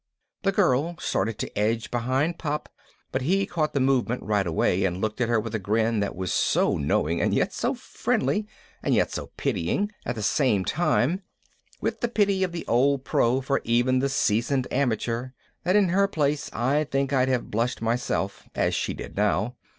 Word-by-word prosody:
The 195 - +2
girl 170 -4 +2
started 105 -4 -1
to - - -5
edge 110 +2 0
behind 130 +8 0
Pop, 150 -2 -3 0.4
but 130 - -1
he 190 +8 +2
caught 155 -5 -2
the - - +3
movement 130 -2 +1
right 105 -3 +1
away 90 +3 +1
and 90 -1 0
looked 110 +4 -2
at 120 - +1
her 115 -1 +3
with 115 +1 -5
a 110 - 0
grin 110 +3 +1
that 100 -1 -2
was 90 -1 -2
so - - +2
knowing 75 +3 0
and - - +1
yet - - +1
so - - -1
friendly, 180 +11 -1 0.3
and - - +1
yet - - +2
so - - -4
pitying 205 +1 -1
at - - -3
the 110 - -4
same 105 -5 +2
time 170 +1 +1 0.6
with - - -2
the 240 - +2
pity 200 -4 +2
of 185 - -1
the 170 -1 -5
old 135 +3 +2
pro 125 +3 +2
for 135 +1 0
even 120 +2 +2
the 140 +1 +1
seasoned 125 +1 +1
amateur 120 -1 0 0.4
that 185 +2 +3
in 200 -3 +4
her 200 +3 +3
place 150 -5 0
I 135 +6 +1
think 135 0 -1
I'd 130 -1 +3
have 125 -2 -1
blushed 115 +3 0
myself, 115 -4 -2
as - - +1
she - - -1
did - - -8
now 105 +3 +1
130 Hz, 190 wpm, -26 LUFS, 110-150 Hz, 0.6 s, in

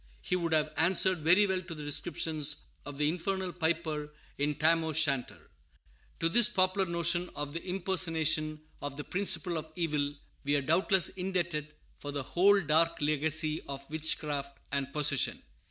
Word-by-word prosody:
He - - -2
would 170 -2 -2
have 155 -1 +1
answered 185 +2 +4
very 180 +7 +4
well 190 -2 -1
to 170 -2 -8
the 150 - -8
description 155 +1 -1 0.5
of 145 -1 -6
the 150 0 +2
infernal 185 +2 -2
piper 160 -3 -2 0.3
in 145 +1 0
Tam 165 +2 +3
O'Shanter. 155 -5 +1 0.8
To 165 - +2
this 230 +6 +6
popular 185 0 +1
notion 170 +1 0
of 145 0 -4
the 170 - -5
impersonation 165 -5 0 0.2
of 145 -1 -5
the 145 - -4
principle 180 -2 +1
of 155 0 -11
evil 150 -4 -1 0.3
we 145 +1 +1
are 145 - +2
doubtless 185 +5 +3
indebted 170 -5 -3 0.2
for 145 - -6
the 145 -1 -3
whole 200 +8 +4
dark 165 +1 +2
legacy 155 +1 +1
of 140 0 -7
witchcraft 150 -3 -3
and 140 -1 -2
possession. 145 -2 0
160 Hz, 155 wpm, -30 LUFS, 150-180 Hz, 0.8 s, this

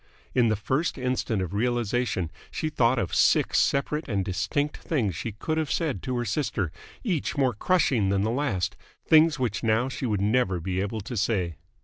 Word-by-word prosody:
In 120 -2 +4
the 110 - +2
first 130 +12 -1
instant 125 -5 -1
of 90 - -5
realisation 120 -5 0 0.2
she 155 - -2
thought 130 -4 +2
of 95 -7 -2
six - - +4
separate 150 +3 0
and 100 -4 0
distinct 100 +11 -1
things 115 - -1
she 110 +7 -4
could 155 +9 -2
have 155 -3 -1
said 160 -5 -1
to 130 -2 -2
her 120 - -1
sister, 110 - -1 0.3
each 175 - -1
more 130 -3 +2
crushing 120 - +2
than 100 0 +1
the 110 - 0
last 120 - -1 0.3
things 155 -1 +6
which 120 -6 -1
now 115 +3 +2
she 130 -1 -3
would 105 -3 0
never 100 -3 +2
be 95 +2 -2
able 105 +2 -3
to 120 +5 -6
say. 95 -6 0
120 Hz, 190 wpm, -26 LUFS, 100-135 Hz, 0.3 s, things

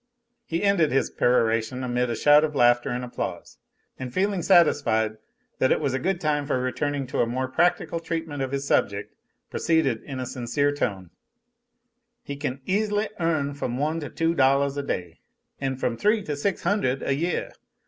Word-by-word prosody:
He 165 +3 -2
ended 195 -8 +3
his 135 - +1
peroration 115 +1 +1
amid 125 0 0
a 115 - -1
shout 145 +5 +5
of 150 -1 -1
laughter 120 -2 +4
and 125 +1 -3
applause, 125 - -6 0.4
and 130 -1 -5
feeling 195 +3 0
satisfied 130 - +3 0.4
that 130 - +3
it - - +3
was 140 -4 -1
a 130 - 0
good 185 +4 -1
time 150 -3 0
for 130 - 0
returning 140 +2 -2
to 130 - -4
a 115 - +3
more 130 +2 -2
practical 170 +4 +1
treatment 165 -3 -4
of 130 -1 -2
his 140 0 -2
subject, 100 -6 0 0.4
proceeded 155 -9 +1
in 135 -2 -7
a 130 - -3
sincere 125 +4 0
tone: 100 -11 -3 1.1
"He 140 - -6
can 140 -1 -4
easily 210 +2 0
earn 155 -4 0
from 125 -3 -3
one 155 +4 0
to 145 - -6
two 165 0 0
dollahs 140 -1 +3
a 145 - -1
day, 90 -11 -4 0.4
an' 135 -1 -1
from 125 -2 -2
three 210 0 +2
to 150 -5 -3
six 185 +7 -2
hundred 165 -11 0
a 140 - +1
yeah. 170 +5 -2
140 Hz, 180 wpm, -25 LUFS, 125-165 Hz, 1.1 s, shout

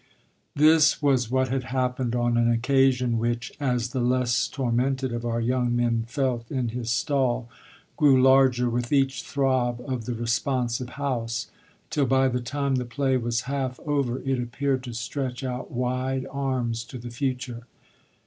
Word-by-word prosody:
This 155 +1 +5
was 130 -5 +2
what 130 0 +1
had 130 0 -1
happened 125 -1 -1
on 120 0 +1
an 120 0 +3
occasion 125 0 +2
which, 120 +1 -2
as 125 -4 0
the 130 - -3
less 120 -1 +1
tormented 130 0 -1
of 120 0 -4
our 115 0 -1
young 120 +1 0
men 115 -1 +1
felt 125 -2 -2
in 130 -4 -1
his 115 0 -4
stall, 125 -1 0 0.5
grew 145 -5 +5
larger 130 -1 +5
with 120 0 -2
each 135 -2 +2
throb 130 -3 0
of 125 -4 -3
the 120 - -3
responsive 120 +1 -1
house; 120 -4 -2 0.4
till 140 -3 +1
by 130 +1 +3
the 125 0 -1
time 140 +2 -1
the 125 - -1
play 135 +2 0
was 120 -1 0
half 135 -1 -3
over 140 -5 0
it 135 -1 0
appeared 130 +2 -1
to 120 - -6
stretch 125 +2 -4
out 125 -1 -4
wide 130 +2 -1
arms 130 -4 -1
to 130 - -9
the 120 0 -8
future. 125 -1 -3
125 Hz, 160 wpm, -25 LUFS, 120-135 Hz, 0.5 s, This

